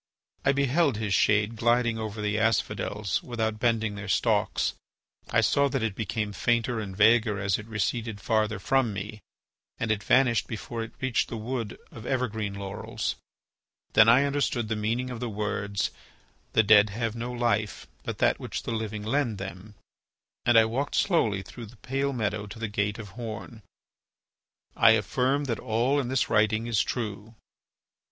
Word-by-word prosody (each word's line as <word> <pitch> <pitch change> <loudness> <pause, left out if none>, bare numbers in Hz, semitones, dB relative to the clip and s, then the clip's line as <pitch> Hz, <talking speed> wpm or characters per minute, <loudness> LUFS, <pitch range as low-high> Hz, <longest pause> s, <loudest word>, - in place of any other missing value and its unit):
I 135 - +4
beheld 140 -1 +2
his. 105 -2 -1
shade 105 +3 +3
gliding 120 0 +2
over 110 -1 -4
the 105 +1 0
asphodels 105 -2 0
without 110 -3 -2
bending 115 -3 +1
their 100 0 -7
stalks. 95 - +1 0.6
I - - +3
saw 140 0 +3
that 130 -3 -1
it 110 -3 0
became 110 0 -3
fainter 120 +2 0
and 95 -3 -6
vaguer 110 0 +4
as 100 -1 0
it 105 - -9
receded 110 0 -2
farther 110 -1 0
from 120 +3 +1
me, 105 +2 -6 0.6
and 115 - -1
it 105 -2 0
vanished 125 -2 +3
before 115 +1 -5
it 115 +1 -6
reached 130 -3 0
the 115 - -4
wood 115 -1 -4
of 110 +1 -9
evergreen 110 -6 -1
laurels. 100 0 -4 0.8
Then 110 +1 +7
I 125 +4 +6
understood 140 -5 0
the 110 - 0
meaning 115 +4 -1
of 120 - -5
the 120 -1 -3
words, 100 -1 -2 0.6
"The 110 - +5
dead 105 0 +6
have 115 +2 -3
no 120 +1 -4
life, 115 -3 -1 0.2
but - - -5
that - - +2
which - - -5
the - - -4
living 110 -2 -3
lend 120 -1 0
them," 95 +2 -8 0.7
and 120 -1 +6
I 110 - +7
walked 130 +6 -2
slowly 110 - +2
through 115 +4 -10
the 115 +3 -16
pale 135 +4 -1
meadow 105 -4 -2
to 105 - -9
the 115 0 -3
gate 105 0 -1
of 110 -3 -8
horn. 115 +1 -7 1.1
I 110 - +7
affirm 130 +6 +1
that 120 -5 -2
all 120 +6 +1
in 135 - -2
this 130 0 +1
writing 110 0 +2
is 115 -3 +2
true. 110 -1 -4
110 Hz, 170 wpm, -27 LUFS, 105-120 Hz, 1.1 s, Then